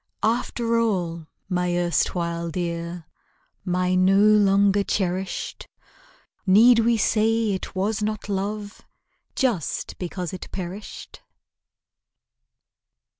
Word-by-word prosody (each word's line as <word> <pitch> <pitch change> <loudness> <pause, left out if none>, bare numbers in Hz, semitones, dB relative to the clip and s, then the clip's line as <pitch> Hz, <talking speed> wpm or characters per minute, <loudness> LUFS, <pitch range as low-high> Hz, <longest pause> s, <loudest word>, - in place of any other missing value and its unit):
After 230 0 0
all, 175 -8 -1 0.2
my 180 -1 0
erstwhile 170 -1 -1
dear, 170 0 -4 0.6
My 180 0 0
no 185 +1 +4
longer 200 -1 +4
cherished, 190 -1 -3 0.8
Need 230 +5 +7
we 230 0 +3
say 220 +1 +2
it 190 0 -5
was 205 +3 -1
not 215 0 -3
love, 205 +1 -4 0.5
Just 235 - -1
because 180 -1 -4
it 185 - -7
perished? 190 +2 -7
195 Hz, 90 wpm, -24 LUFS, 180-215 Hz, 0.8 s, Need